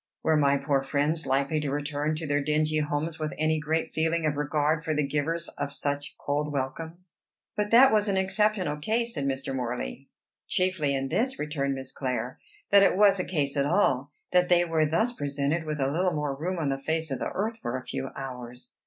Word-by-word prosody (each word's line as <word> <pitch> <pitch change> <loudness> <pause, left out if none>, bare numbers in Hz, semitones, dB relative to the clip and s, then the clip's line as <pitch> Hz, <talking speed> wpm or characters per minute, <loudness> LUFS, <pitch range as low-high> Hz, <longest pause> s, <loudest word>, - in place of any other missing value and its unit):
Were 160 - +3
my 140 -2 +3
poor 140 0 +1
friends 150 +4 0
likely 140 +3 +1
to 150 -2 -2
return 145 +2 -1
to 160 +1 -4
their 145 -1 0
dingy 155 +1 +1
homes 150 +2 -2
with 155 -1 -3
any 155 0 +1
great 160 +2 -1
feeling 160 +1 +1
of 150 -1 +1
regard 150 +2 0
for 155 -1 -1
the 150 -1 +1
givers 155 +4 -1
of 140 - -2
such 145 0 -2
cold 145 +1 -2
welcome?" 160 +6 -4 0.5
"But 210 0 -1
that 245 +2 +7
was 210 -1 +3
an 195 -1 +1
exceptional 190 -4 +1
case," 230 +9 0
said 140 - -2
Mr. 135 0 -2
Morley. 120 - -4 0.4
"Chiefly 180 -7 +1
in 135 0 -2
this," 260 - 0
returned 140 -2 -2
Miss 130 0 -6
Clare, 125 -1 -3 0.3
"that 200 - +8
it 195 - +4
was 200 -2 +5
a - - +1
case 145 -7 -1
at 140 0 +1
all 145 -6 +2 0.2
that 180 0 +3
they 175 -1 +5
were 160 -2 +2
thus 195 +11 +1
presented 145 - -1
with 150 -1 -3
a 135 0 +1
little 180 +2 +1
more 150 -2 -1
room 175 +6 -3
on 155 -4 -1
the 135 0 -1
face 160 +1 -1
of 135 - -2
the - - -2
earth 220 +4 -2
for 120 +2 -3
a 130 - -8
few 135 +1 -4
hours." 125 -2 -7
150 Hz, 210 wpm, -27 LUFS, 140-170 Hz, 0.5 s, that